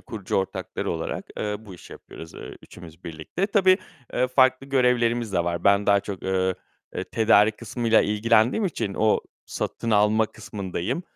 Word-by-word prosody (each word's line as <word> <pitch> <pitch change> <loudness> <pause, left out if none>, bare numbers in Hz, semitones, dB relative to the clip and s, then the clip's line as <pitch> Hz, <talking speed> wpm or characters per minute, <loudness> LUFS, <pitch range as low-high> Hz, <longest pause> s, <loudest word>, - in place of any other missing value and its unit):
kurucu 105 -5 -4
ortakları 95 - -3
olarak, - - -4
eee, 105 -1 -2
bu 105 -4 -12
işi 90 - -13
yapıyoruz, 80 0 -12
eee, - - -9
üçümüz 85 0 -14
birlikte. 85 - -3
Tabii, 190 -2 +4 0.3
eee, 125 +1 +1
farklı 130 +1 +3
görevlerimiz 120 -4 +1
de 85 -3 +1
var. 85 0 -3
Ben 100 0 +4
daha 100 -1 +4
çok, 100 -2 -7
eee, 95 -1 0 0.6
tedarik 110 -1 +4
kısmıyla 115 0 +1
ilgilendiğim 115 - +2
için, 120 - -2
o 110 0 +3 0.3
satın 115 - -4
alma 105 +1 +3
kısmındayım. 100 - -5
110 Hz, 150 wpm, -24 LUFS, 95-120 Hz, 0.6 s, Tabii